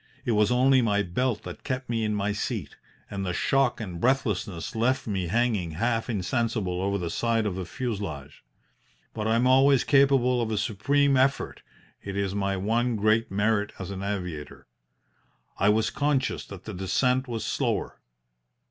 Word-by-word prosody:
It - - +1
was 105 -1 +3
only 130 +1 +4
my 105 -3 +2
belt 120 +6 -1
that - - -9
kept 130 -2 -3
me 115 -1 -1
in 105 -1 0
my 105 0 0
seat, 105 - -4 0.4
and 100 -1 -3
the 90 -2 -2
shock 135 +3 +2
and 90 -6 -6
breathlessness 105 -9 0
left 125 +4 +1
me 95 -5 -2
hanging 105 -5 0
half 115 +2 0
insensible 100 -2 -1
over 100 +1 0
the 85 -3 -3
side 115 +1 0
of 105 - -1
the 95 0 -4
fuselage. 100 - -5 0.7
But 110 0 -3
I 110 - +3
am 120 +2 +2
always 135 +1 +5
capable 135 -3 +4
of 115 - -1
a 110 - -1
supreme 140 +7 +2
effort 135 +1 +1 0.4
it 100 0 -5
is 100 -1 -1
my 100 -1 -1
one 115 +5 0
great 110 +2 +2
merit 105 +1 0
as 95 0 -6
an 95 -1 -5
aviator. 90 -7 -5 0.9
I 100 - +4
was 110 +1 +2
conscious 145 -2 0
that 100 -3 -10
the 110 - -6
descent 125 +8 +1
was 115 -2 -4
slower. - - -2
110 Hz, 170 wpm, -26 LUFS, 100-125 Hz, 0.9 s, always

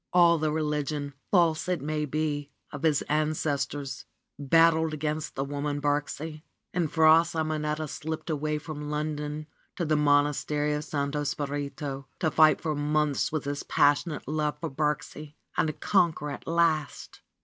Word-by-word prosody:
All 170 -2 +6
the 155 0 0
religion, 150 -2 -2 0.2
false 170 -2 +3
it 180 -3 +1
may 150 +2 -2
be, 145 0 -2 0.2
of 145 - -7
his 155 -3 +2
ancestors, 145 -2 -1 0.3
battled 160 +2 +4
against 150 +1 -3
the 135 - -1
woman, 145 +1 -3
Birksie. 145 +2 -2 0.3
And 170 -4 0
Fra 160 0 +6
Simonetta 155 -2 -2
slipped 160 +2 -5
away 150 0 -1
from 150 0 -6
London 150 0 -3 0.3
to 175 - -2
the 155 0 +2
Monastery 150 0 +2
of 150 0 -3
Santo 145 0 -2
Spirito 140 -1 -4
to 160 - +1
fight 155 +1 +5
for 155 -3 -1
months 150 0 0
with 155 -2 -2
his 145 0 -3
passionate 145 +1 +1
love 150 0 -1
for 165 -4 -4
Birksie 150 +1 -3 0.2
and 155 -1 0
conquer 170 -6 +2
at - - -8
last 165 -4 0
150 Hz, 145 wpm, -28 LUFS, 145-155 Hz, 0.3 s, All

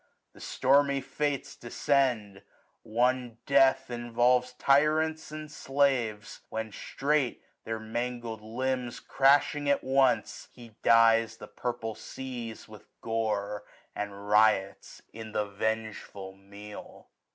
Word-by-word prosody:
The - - -16
stormy 140 +1 +2
Fates 145 +1 -3
descend: 120 -6 0 0.4
one 120 +1 0
death 135 -1 +4
involves 120 +1 +1
Tyrants 155 +4 +2
and 155 -1 -7
slaves; 130 -8 0
when 110 0 -4
strait, 140 +4 -1 0.2
their 110 0 -3
hiangled 120 0 -4
limbs 125 +2 -3
Crashing 145 +1 +3
at 140 - +2
once, 135 0 +1
he 115 -3 -14
dyes 115 -1 +4
the - - -9
purple 120 -2 -4
seas 120 -2 -7
With 105 -2 -14
gore, 105 -2 -2 0.3
and 100 0 -5
riots 105 -2 +2
in 110 -1 -9
the 105 - 0
vengeful 105 -2 -4
meal. 100 +2 -12
120 Hz, 105 wpm, -29 LUFS, 110-135 Hz, 0.4 s, death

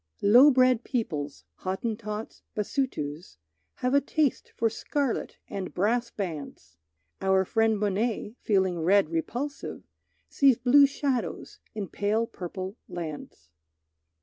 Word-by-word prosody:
Low 245 +8 +8
bred 255 -3 +4
peoples, 150 - -3
Hottentots, 215 +2 -4
Basutos, 180 - -3 0.4
Have 250 +1 -1
a 280 - +5
taste 295 -1 0
for 230 - +2
scarlet 270 +3 -2
and 190 -2 -5
brass 235 +6 +1
bands. 150 - -6 0.5
Our 190 0 +3
friend 225 +1 +2
Monet, 210 +2 -1
feeling 190 -4 +1
red 185 0 +3
repulsive, 245 - -4 0.4
Sees 270 -4 +4
blue 270 +3 +6
shadows 275 -3 -3 0.2
in 205 -3 -3
pale 210 +5 0
purple 185 +1 -6
lands. 155 - -7
215 Hz, 110 wpm, -27 LUFS, 185-245 Hz, 0.5 s, Low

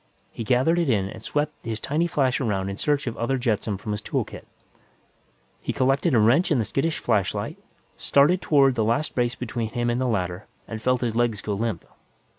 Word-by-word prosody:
He 115 - -5
gathered 130 +9 +2
it 165 -5 +1
in 100 -5 +1
and 110 +1 -9
swept 150 +5 -2
his 110 -1 -3
tiny 155 +9 0
flash 135 -6 +1
around 100 -5 -1
in 100 - -4
search 145 -1 0
of 120 - -3
other 130 +3 0
jetsam 110 -4 -1
from 105 +2 -6
his 105 0 -3
tool - - -1
kit. - - -11 1.1
He - - -2
collected 135 +3 +2
a - - +5
wrench 120 +11 +4
and 150 -6 +2
the 110 - 0
skittish 150 +9 -1
flashlight, 100 -3 -1 0.4
started 155 +6 +3
toward 140 -5 +4
the 115 -3 0
last 115 +8 0
brace 120 -1 0
between 115 -1 -3
him 120 +1 -1
and 120 +2 -1
the 130 - +1
ladder, 90 -4 -2 0.2
and 110 -1 -6
felt 125 +1 +1
his 115 -3 -1
legs 120 -3 +1
go 105 - -3
limp. 115 +2 -2
120 Hz, 210 wpm, -24 LUFS, 110-135 Hz, 1.1 s, a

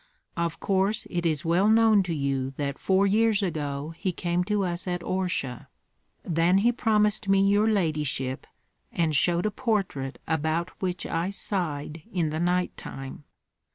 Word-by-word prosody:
Of 170 -1 -2
course 195 +2 0
it 175 -1 0
is 155 -2 -1
well 180 +5 +3
known 220 -2 +5
to 165 - 0
you 135 -2 -2
that 140 -1 -3
four 190 +1 +3
years 215 +1 +3
ago 150 -3 -3
he 185 - -2
came 175 0 -1
to 210 0 0
us 175 0 -3
at 175 -1 -2
Orsha. 175 -10 -2 0.6
Then 170 +2 +2
he 240 - +6
promised 210 -3 +1
me 195 0 +4
your 205 +2 +3
ladyship, 150 -9 -1 0.4
and 160 -3 0
showed 175 +5 +3
a 215 - +1
portrait 195 - -2
about 160 +2 0
which 180 -1 -2
I 165 +3 -1
sighed 165 -6 -3
in 170 -6 0
the 155 - -2
night 180 +1 0
time. 135 +2 -8
175 Hz, 155 wpm, -26 LUFS, 155-195 Hz, 0.6 s, he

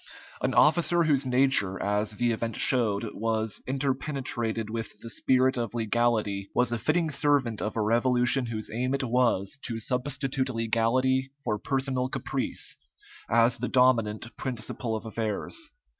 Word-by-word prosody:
An - - 0
officer 170 +2 +4
whose 140 -4 +2
nature, 125 -7 +2
as 105 +1 0
the 120 +2 +1
event 115 -1 -2
showed, 115 -4 +1
was 110 -1 -1
interpenetrated 130 -4 -2
with 110 -1 -5
the 115 +2 -8
spirit 130 +1 +2
of 120 -1 -3
legality, 110 -3 0
was 125 -1 +2
a 120 - -1
fitting 160 +4 +1
servant 140 -6 +1
of 105 - -3
a - - +2
revolution 125 +3 +2
whose 110 -2 -4
aim 125 +4 0
it 140 - -2
was 120 -2 +1
to 115 -3 -4
substitute 130 +2 -1
legality 130 +3 +1
for 105 -5 -1
personal 130 0 -1
caprice, - - -2 0.5
as 115 +2 +3
the 125 - -2
dominant 120 -3 +2
principle 120 -2 -3
of 110 - -5
affairs. 110 - -3
120 Hz, 145 wpm, -27 LUFS, 110-130 Hz, 0.5 s, officer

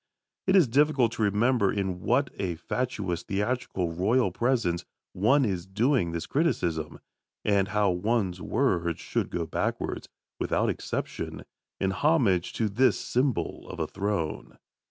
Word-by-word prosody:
It 190 - +4
is 180 -8 +6
difficult 135 -2 +3
to 115 - -5
remember 105 +1 +3
in 95 -3 -2
what 130 +6 +1
a 90 -3 -1
fatuous 95 -1 -2
theatrical 100 -4 -2
Royal 100 +5 +2
Presence 110 -6 0 0.3
one 130 +9 +3
is 95 -4 -2
doing 110 - +1
this 85 -1 -3
criticism, 85 - 0 0.5
and 100 -2 +3
how 105 -1 +2
one's 95 -1 0
words 85 - 0
should - - -2
go 85 -1 -2
backwards, - - -3 0.3
without - - +1
exception, - - -4 0.4
in 95 - +1
homage 100 - +2
to 110 - 0
this 125 +6 +3
symbol 125 -1 -1
of - - -7
a - - +1
throne. 100 -5 -3
105 Hz, 135 wpm, -27 LUFS, 90-125 Hz, 0.5 s, is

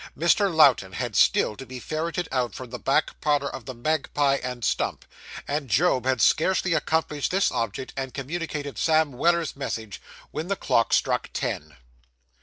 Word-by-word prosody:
Mr. 185 +4 +3
Lowten 135 - +4
had - - -4
still 105 - +3
to 135 - -9
be 130 0 -8
ferreted 165 +5 -3
out 125 -2 -1
from 125 -2 -8
the 125 - -5
back 145 +3 0
parlour 145 -2 +1
of 130 -3 -8
the 130 -1 -7
Magpie 145 +1 +1
and 125 -3 -4
Stump; - - -1 0.4
and 145 -2 -2
Job 130 -1 +2
had 130 -3 +1
scarcely 185 +2 +3
accomplished 155 -3 0
this 190 +1 +2
object, 115 +1 -3
and 135 -1 -4
communicated 145 +1 -5
Sam 160 -2 +3
Weller's 170 +5 +1
message, 110 -7 -5 0.3
when 155 +3 -4
the 200 - 0
clock 115 -10 +1
struck - - +1
ten. 75 0 -3
140 Hz, 165 wpm, -25 LUFS, 125-160 Hz, 0.4 s, Lowten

